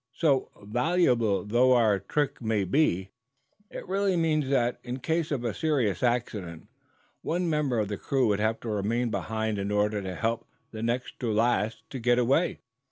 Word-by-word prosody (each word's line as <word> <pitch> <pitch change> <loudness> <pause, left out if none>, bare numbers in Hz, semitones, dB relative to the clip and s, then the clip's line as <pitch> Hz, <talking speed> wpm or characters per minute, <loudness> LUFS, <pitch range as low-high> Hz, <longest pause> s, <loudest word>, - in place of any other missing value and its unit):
So, 140 -5 +2
valuable 120 - +2
though 120 +5 +4
our 110 -5 +3
trick 140 +9 -2
may 110 -3 0
be, 95 - +1 0.6
it - - -8
really 195 0 +1
means 155 -4 +1
that, 120 -3 +1
in 125 +1 -4
case 160 +4 -1
of 130 -5 -2
serious 135 -11 0
accident, 110 -9 -2 0.5
one 175 +2 -1
member 150 -6 0
of 105 -2 0
the 100 0 -4
crew 135 +4 0
would 100 -1 +1
have 110 +1 0
to 115 - -5
remain 110 +3 0
behind 110 -2 -2
in 100 +1 -2
order 105 0 +1
to 95 -1 -5
help 115 +5 -2 0.2
the 110 - -7
next 120 +2 -2
to 120 -3 -1
last 110 0 0
to 135 - -5
get 120 +1 +3
away. 135 +8 +2
120 Hz, 170 wpm, -27 LUFS, 105-135 Hz, 0.6 s, though